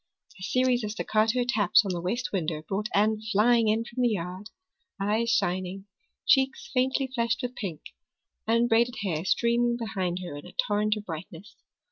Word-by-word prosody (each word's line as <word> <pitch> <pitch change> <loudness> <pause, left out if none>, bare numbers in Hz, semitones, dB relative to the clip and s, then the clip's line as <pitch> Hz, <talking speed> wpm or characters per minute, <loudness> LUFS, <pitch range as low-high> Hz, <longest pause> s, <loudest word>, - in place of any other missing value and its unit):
A - - -15
series 250 +4 +1
of 210 - -2
staccato 220 +3 +1
taps 220 -1 +4
on 195 - -1
the 175 -1 -3
west 235 +9 -2
window 160 -4 -2
brought 210 +2 -2
Anne 215 +1 +2
flying 225 +2 +4
in 220 +2 +2
from 240 +2 -5
the 245 - +4
yard, 185 0 -4 0.5
eyes 215 +4 0
shining, 185 -2 -1 0.4
cheeks 265 -1 +2
faintly 265 +1 +1
flushed 235 -2 0
with 250 0 -3
pink, 185 -10 -5 0.7
unbraided 235 +1 +3
hair 165 -5 -1
streaming 235 +4 +2
behind 190 -6 -2
her 160 - -6
in 145 +4 -9
a - - -13
torrent 210 +1 +1
of 210 - -8
brightness. 165 +2 -8
215 Hz, 165 wpm, -27 LUFS, 185-235 Hz, 0.7 s, taps